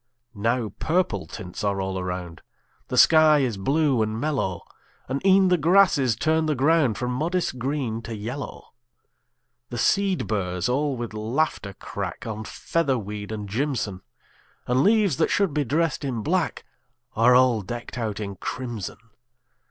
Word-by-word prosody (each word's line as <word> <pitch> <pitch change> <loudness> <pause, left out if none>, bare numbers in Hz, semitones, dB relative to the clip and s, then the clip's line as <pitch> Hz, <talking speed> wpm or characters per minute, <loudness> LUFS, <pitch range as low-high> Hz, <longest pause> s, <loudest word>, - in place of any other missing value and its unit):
Now 115 +2 0
purple 175 +2 0
tints 95 0 -7
are 100 -1 0
all 95 0 -2
around; 90 -2 -5 0.5
The - - -3
sky 155 -2 +6
is 125 -5 0
blue 135 +4 +1
and 110 +1 -1
mellow; 135 -10 -1 0.4
And 135 +2 -3
e'en 190 -1 +5
the 180 -1 +3
grasses 160 - +4
turn 160 0 +1
the 155 - +1
ground 140 -4 +3
From 125 0 -2
modest 160 +1 -1
green 125 -4 -2
to 115 0 -6
yellow. 125 +6 -7 1.0
The 120 - -5
seed 195 - +1
burrs 90 -4 -1
all 140 +1 0
with 120 -2 -5
laughter 110 -1 -1
crack - - -6
On 110 -1 -5
featherweed 110 -8 -2
and 105 -2 -5
jimson; 110 -4 -2 0.6
And 125 +2 +2
leaves 205 - +3
that - - +2
should 195 -7 +1
be 150 - +1
dressed 155 +5 0
in 125 -6 -3
black 175 +2 -1 0.5
Are 125 +3 +5
all 125 -3 +4
decked 120 +6 -7
out 110 -3 -3
in 100 -2 -5
crimson. 120 -3 -5
125 Hz, 150 wpm, -24 LUFS, 105-155 Hz, 1.0 s, sky